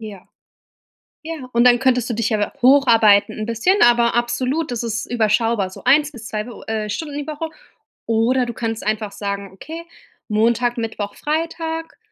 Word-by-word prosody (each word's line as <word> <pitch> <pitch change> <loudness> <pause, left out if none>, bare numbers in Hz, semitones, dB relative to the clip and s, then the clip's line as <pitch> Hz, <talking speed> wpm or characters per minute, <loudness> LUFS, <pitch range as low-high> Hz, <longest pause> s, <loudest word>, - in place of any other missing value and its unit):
Ja. 205 -4 -10 1.0
Ja, 310 -6 -7
und 235 +1 +3
dann 245 0 +5
könntest 250 -2 +1
du - - -1
dich 220 -1 -1
ja 210 -2 -1
hocharbeiten 230 -7 +5
'n 215 - -3
bisschen, 230 - +1
aber 235 -1 +4
absolut, 250 +5 -1
das 235 -1 -3
ist 220 -2 -3
überschaubar, 225 -3 +1
so - - -12
1 290 +4 +4
bis 225 -3 -9
2, 215 0 -3
w 240 - -10
äh, 215 -1 -2
Stunden 290 +5 -4
die 290 - -5
Woche, 310 +1 -4 0.6
oder 235 +3 +2
du 240 - -5
kannst 225 -2 -4
einfach 215 -1 -1
sagen: 200 -1 -5
„Okay, 320 - -9 0.5
Montag, 235 +3 +1
Mittwoch, 220 -3 -4
Freitag, 325 +1 -3
235 Hz, 170 wpm, -20 LUFS, 215-270 Hz, 1.0 s, dann